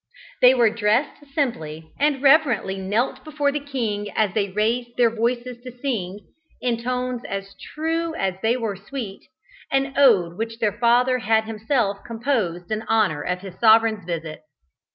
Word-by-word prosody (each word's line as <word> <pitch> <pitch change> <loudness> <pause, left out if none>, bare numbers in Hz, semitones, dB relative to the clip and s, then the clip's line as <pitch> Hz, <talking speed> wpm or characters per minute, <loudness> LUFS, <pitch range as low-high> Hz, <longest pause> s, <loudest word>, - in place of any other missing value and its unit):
They 250 +1 +7
were 235 -3 +4
dressed 235 +6 0
simply, 160 - -3
and 290 -2 +1
reverently 270 -10 +3
knelt 205 +7 -1
before 295 -2 0
the 295 - -2
king 230 -8 -3
as 210 -4 +1
they 200 -2 0
raised 235 +5 -1
their 235 -2 +4
voices 240 +1 -2
to 250 0 -8
sing 210 -7 -3 0.4
(in 235 -2 -1
tones 250 0 -2
as 195 0 -5 0.2
true 325 +1 -1
as 190 - -1
they 230 +3 +2
were 225 -5 -3
sweet) 200 0 -7 0.5
an 270 0 +1
ode 200 -11 +4
which 225 0 -3
their 215 -4 0
father 245 +3 +3
had 220 -1 +2
himself 220 -1 -1
composed 225 -8 -2
in 215 0 -1
honour 210 -10 +2
of 180 +3 -3
his 190 -2 -10
sovereign's 220 -2 +5
visit. 165 -2 -5
230 Hz, 155 wpm, -23 LUFS, 200-255 Hz, 0.5 s, They